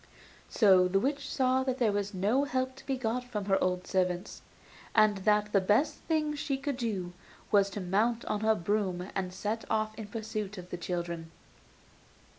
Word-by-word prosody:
So 190 -5 +5
the 195 +2 +2
witch 280 +4 -1
saw 260 -1 +2
there 255 -4 +1
was 205 0 -1
no 210 +8 +1
help 260 -1 -1
to - - -14
be 270 -1 0
got 250 0 -1
from 220 -5 -4
her 195 -1 +2
old 180 0 0
servants, 180 -1 -1 0.5
and 215 -2 +5
that 210 +1 +2
the 195 - +5
best 210 +10 +2
thing 310 -2 +1
she 280 -1 -2
could 275 -1 -3
do 195 -8 -3 0.4
was 200 -1 +4
to 200 +1 -5
mount 215 +6 +1
on 210 - -1
her 220 +1 +3
broom 185 -1 -1
and 185 -1 -2
set 210 +4 -3
off 215 0 0
in 220 -1 -8
pursuit 215 -1 -4
of 180 0 -9
the 175 - -3
children. 170 -2 -4
210 Hz, 180 wpm, -30 LUFS, 190-245 Hz, 0.5 s, So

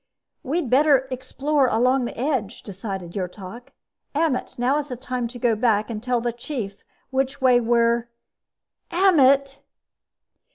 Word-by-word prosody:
"We'd 305 +2 -2
better 270 +1 +4
explore 265 +2 0
along 250 +3 +2
the - - -7
edge," 245 -5 -2
decided 195 -3 -6
Yrtok. 195 +5 -6 0.5
"Ammet, 305 -4 0
now 255 +4 +1
is 295 - -5
the 255 - -5
time 250 0 -3
to 245 +1 -10
go 235 -2 +1
back 215 -1 +1
and 215 -2 -5
tell 250 0 0
the 240 0 -2
Chief 235 -5 -6 0.3
which 265 0 -1
way 255 -2 +5
we're 235 0 +2 0.8
_Ammet! 280 -7 +4
250 Hz, 135 wpm, -23 LUFS, 230-270 Hz, 0.8 s, way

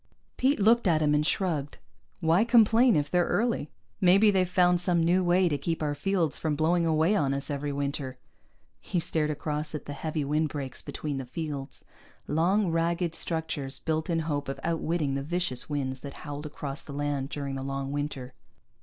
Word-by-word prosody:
Pete 270 0 +2
looked 225 +2 +4
at 160 -3 +3
him, 150 0 +3
and 150 0 +3
shrugged. 155 -4 -1 0.4
"Why 165 +5 +4
complain 235 0 +5
if 145 -1 0
they're 180 -1 +3
early? 230 -9 0 0.3
Maybe 200 +3 +6
they've 185 -2 +1
found 180 -1 +3
some 175 -2 +2
new 180 +3 +3
way 180 +1 +3
to 145 -4 -1
keep 165 +2 -2
our 145 -1 0
fields 165 0 0
from 155 -2 -1
blowing 165 +3 +2
away 160 +5 +3
on 140 -6 +1
us 140 +2 -2
every 145 0 -2
winter." 140 -2 -3 0.6
He 180 - -2
stared 160 -2 0
across 150 +1 -3
at 150 - -6
the 145 - -5
heavy 155 0 -3
windbreaks 145 -3 -2
between 145 -3 -4
the 135 - -4
fields 140 -1 -6 0.4
long, 175 +5 +2
ragged 170 +1 0
structures 160 -5 -2
built 160 +1 -2
in 165 -1 +1
hope 145 -3 -2
of 135 - -4
outwitting 165 -3 -1
the 135 - -1
vicious 155 -4 0
winds 135 -3 -2
that 140 +1 -8
howled 145 +1 -5
across 145 -1 -6
the 140 - -9
land 145 -1 -2
during 140 -2 -4
the 135 - -4
long 135 0 -3
winter. 140 -3 -4
155 Hz, 185 wpm, -28 LUFS, 145-175 Hz, 0.6 s, Maybe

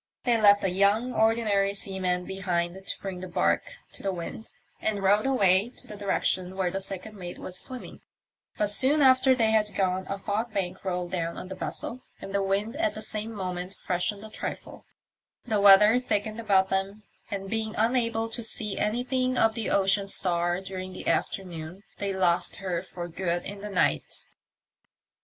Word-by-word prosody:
They 235 -3 +2
left 205 -1 +6
a 195 - +2
young 205 +6 +2
ordinary 215 -3 +2
seaman 185 -2 -2
behind 180 -3 -1
to - - -3
bring 190 -2 -5
the 185 - -6
barque 175 - 0 0.2
to - - -10
the 195 - -1
wind, 180 +5 -6 0.3
and 205 -2 -1
rowed 205 +5 +4
away 205 -3 +3
in - - -15
the 210 - -6
direction 190 -2 -1
where 185 -2 0
the 195 +1 -3
second 195 +3 -6
mate 175 -3 -7
was 185 - -5
swimming; 255 -1 -5 0.6
but 210 -1 +2
soon 280 +7 +4
after 260 0 +6
they 225 -3 +2
had 215 -1 +2
gone 185 -1 0
a 195 - -2
fog 215 +3 -3
bank 185 -1 -2
rolled 180 -2 -2
down 170 -2 -2
on 185 - -7
the 190 - -5
vessel, 240 +6 -5 0.2
the 200 0 -2
wind 200 +4 -1
at 325 -1 0
the 215 - -6
same 215 +1 -4
moment 185 -2 -4
freshened 195 +3 -2
a 220 - -10
trifle, - - -6 0.6
the 215 -4 +1
weather 210 +4 +8
thickened 215 -2 -2
about 195 -4 +3
them, 195 +2 -2 0.3
and 195 -1 -4
being 220 +1 -2
unable 230 0 +1
to 235 - -5
see 215 -2 -3
anything 255 +3 0
of 225 0 +4
the 225 -2 -3
Ocean 195 0 +2
Star 175 -1 +1
during 185 -1 -6
the - - -8
afternoon 175 0 -2 0.2
they 200 -1 -1
lost 180 -3 +2
her 180 -4 -2
for 175 -1 -7
good 175 0 -2
in 200 0 -7
the 210 - -5
night. 190 -3 +1
200 Hz, 180 wpm, -27 LUFS, 185-220 Hz, 0.6 s, weather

